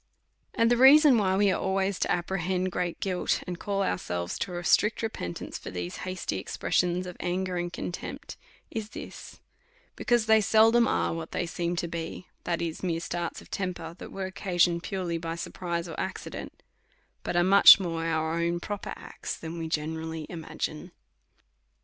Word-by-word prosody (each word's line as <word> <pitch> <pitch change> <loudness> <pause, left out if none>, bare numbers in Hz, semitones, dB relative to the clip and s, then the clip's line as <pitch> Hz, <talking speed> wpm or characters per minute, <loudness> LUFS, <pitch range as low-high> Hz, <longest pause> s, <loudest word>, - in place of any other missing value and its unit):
And 230 +1 +3
the 240 - +4
reason 270 0 +8
why 190 -2 +2
we 200 -1 +4
are - - -1
always 190 0 0
to - - 0
apprehend 185 +1 -1
great 175 -1 -2
guilty 185 -2 0
and 180 -1 -5
call 200 -1 -1
ourselves 90 - -2
to 180 -2 -3
a 175 - -5
strict 215 +6 +3
repentance 90 - -4
for - - -8
these 90 -1 -5
hasty 185 - -3
expressions 180 - 0
of 180 -1 -7
anger 185 +1 -2
and 175 0 -2
contempt^ 175 - -6 0.4
is 220 -2 -4
this; - - -10 0.5
be - - -7
cause 240 -3 +3
they 220 0 +5
seldom 225 +2 +5
are - - +1
what 165 0 -6
they - - -1
seem 175 0 -2
to 170 - -2
be, 165 +1 -5 0.2
that 170 -1 -1
is, 165 -2 -4
mere 170 -3 -1
starts 170 0 -4
of - - -20
temper, 175 -4 -3
that - - -8
are 195 -1 -4
occasioned 175 -2 +1
purely 180 -4 -3
by 165 0 -4
surprise 170 0 -4
or 165 - -7
accident; - - -6 0.6
but - - -3
are 175 - +4
much 200 +2 +9
more 165 -3 -2
our 160 -1 0
own 170 +1 0
proper 205 +3 -5
acts, - - -7
than 165 +1 -6
we 165 - -3
generally 160 +1 -3
imagine. 165 0 -5
175 Hz, 175 wpm, -28 LUFS, 165-195 Hz, 0.6 s, much